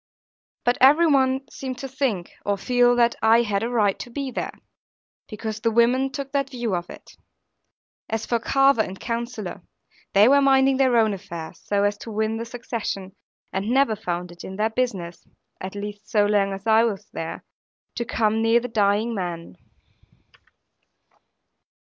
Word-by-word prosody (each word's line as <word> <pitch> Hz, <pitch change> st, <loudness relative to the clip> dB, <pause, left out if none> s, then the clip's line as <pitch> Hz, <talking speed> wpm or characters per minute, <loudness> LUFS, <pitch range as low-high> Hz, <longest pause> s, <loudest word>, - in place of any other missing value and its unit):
But 245 Hz, 0 st, +1 dB
every 295 Hz, +6 st, +7 dB
one 270 Hz, -3 st, +2 dB
seemed 260 Hz, -2 st, -6 dB
to 270 Hz, -, -6 dB
think, 250 Hz, -9 st, -2 dB
or 205 Hz, -1 st, 0 dB
feel, 245 Hz, +3 st, +3 dB
that 235 Hz, -1 st, +3 dB
I 225 Hz, +2 st, +5 dB
had 200 Hz, -3 st, -1 dB
a 230 Hz, -, -1 dB
right 210 Hz, -5 st, +1 dB
to -, -, -7 dB
be 270 Hz, +2 st, -4 dB
there; -, -, -4 dB, 0.7 s
because 215 Hz, 0 st, -5 dB
the 230 Hz, -, +1 dB
women 240 Hz, +4 st, +3 dB
took 275 Hz, 0 st, -5 dB
that 275 Hz, -1 st, 0 dB
view 240 Hz, -5 st, -3 dB
of 175 Hz, 0 st, -4 dB
it. -, -, -13 dB, 0.9 s
As 225 Hz, 0 st, -2 dB
for 235 Hz, -, 0 dB
Carver 270 Hz, +1 st, +3 dB
and 190 Hz, -2 st, -5 dB
Counsellor, 230 Hz, -5 st, -4 dB, 0.5 s
they 200 Hz, +2 st, +6 dB
were 280 Hz, +2 st, +5 dB
minding 270 Hz, -1 st, +4 dB
their 260 Hz, -3 st, +3 dB
own 220 Hz, -2 st, +3 dB
affairs, 170 Hz, -4 st, -8 dB
so 200 Hz, -1 st, 0 dB
as 205 Hz, 0 st, 0 dB
to -, -, -8 dB
win 220 Hz, +1 st, -1 dB
the 230 Hz, -, -4 dB
succession; 230 Hz, -5 st, -5 dB, 0.4 s
and 195 Hz, +3 st, -2 dB
never 255 Hz, -3 st, +3 dB
found 180 Hz, -4 st, -4 dB
it 170 Hz, -, -12 dB
in 190 Hz, -, -7 dB
their 215 Hz, +2 st, 0 dB
business 195 Hz, -8 st, -3 dB, 0.3 s
(at 190 Hz, +2 st, -6 dB
least 205 Hz, +1 st, -7 dB
so 210 Hz, -2 st, +3 dB
long 205 Hz, -1 st, +2 dB
as 195 Hz, +2 st, -7 dB
I 225 Hz, 0 st, +5 dB
was 210 Hz, -5 st, -2 dB
there) 165 Hz, -, -5 dB, 0.5 s
to 240 Hz, -, -2 dB
come 220 Hz, -1 st, 0 dB
near 225 Hz, +1 st, +4 dB
the 245 Hz, -, -5 dB
dying 215 Hz, +1 st, +1 dB
man. 175 Hz, -, -5 dB
225 Hz, 170 wpm, -23 LUFS, 200-250 Hz, 0.9 s, every